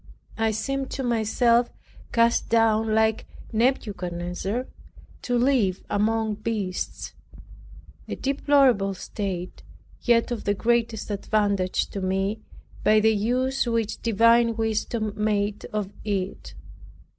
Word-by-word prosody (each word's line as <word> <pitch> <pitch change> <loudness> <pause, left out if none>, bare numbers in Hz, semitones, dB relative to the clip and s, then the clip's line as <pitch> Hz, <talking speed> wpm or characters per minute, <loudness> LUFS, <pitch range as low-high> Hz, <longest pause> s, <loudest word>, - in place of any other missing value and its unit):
I 225 0 +2
seemed 270 +5 -2
to 270 - -3
myself 235 +1 +2 0.4
cast 235 0 +2
down 225 -1 +3
like 220 0 +1 0.3
Nebuchadnezzar, 200 -2 -1 0.6
to 245 -1 0
live 240 -7 +2
among 215 +1 +1
beasts; 210 -5 -3 0.9
a - - -4
deplorable 270 -8 +2
state, 185 -2 -5 0.4
yet 235 0 +2
of 235 - -4
the 205 - +1
greatest 230 -1 0
advantage 200 -2 0
to 195 - -4
me, 195 +3 -1 0.4
by 215 +1 +5
the 220 +1 +4
use 250 +5 0
which 230 -2 -1
divine 230 +1 +4
wisdom 220 -1 -1
made 210 -1 -1
of 205 -1 -4
it. 195 -2 -3
220 Hz, 110 wpm, -25 LUFS, 205-235 Hz, 0.9 s, by